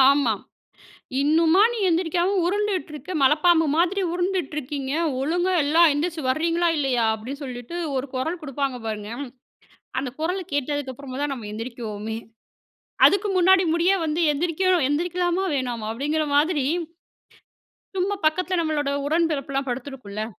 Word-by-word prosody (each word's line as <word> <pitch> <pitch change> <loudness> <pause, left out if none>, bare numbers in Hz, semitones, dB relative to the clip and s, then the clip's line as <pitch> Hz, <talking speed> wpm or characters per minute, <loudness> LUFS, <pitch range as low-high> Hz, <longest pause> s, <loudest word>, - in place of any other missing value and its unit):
ஆமா. 270 -3 +5 0.9
"இன்னுமா 325 +5 +4
நீ - - -4
எந்திரிக்காம 350 +3 +1
உருண்டுட்டு 395 -2 -1
இருக்க? 300 +5 -8
மலப்பாம்பு 320 +4 +4
மாதிரி 370 +3 +2
உருண்டுட்டு 355 -4 -1
இருக்கீங்க. 275 -1 -4 0.3
ஒழுங்கா 350 +5 +1
எல்லாம் 325 +3 +5
எந்திரிச்சி 320 +2 -2
வர்றீங்களா, 335 +4 +1
இல்லையா?" 255 -5 +1
அப்டின்னு 250 +7 -7
சொல்லிட்டு 245 +3 -7 0.2
ஒரு 260 +2 -2
கொரல் 320 +7 -2
குடுப்பாங்க 275 -3 -3
பாருங்க, 210 -1 -4 0.9
அந்த 260 - -4
கொரல் 360 +4 -1
கேட்டதுக்கு 285 -1 -1
அப்புறமாதான் 280 +2 -4
நம்ம 235 -6 -6
எழுந்திரிக்கவோமே! 220 -1 -5 0.9
அதுக்கு 400 +1 +4
முன்னாடி 375 +1 +5
முடிய 340 +3 +3
வந்து 315 +2 -1
"எந்திரிக்கணும் 345 0 +1
எந்திரிக்கலாமா, 355 +4 0
வேணாமா?" 240 -5 -3
அப்டிங்கிற 300 +5 -1
மாதிரி 295 -1 +2 1.3
சும்மா 390 +2 0
பக்கத்ல 365 +4 +1
நம்மளோட 300 -3 -1 0.2
உடன் 330 +2 +2
பெறப்புலாம் 275 -1 -2
படுத்திருக்கும்ல. 245 -5 -5
300 Hz, 125 wpm, -24 LUFS, 265-350 Hz, 1.3 s, ஆமா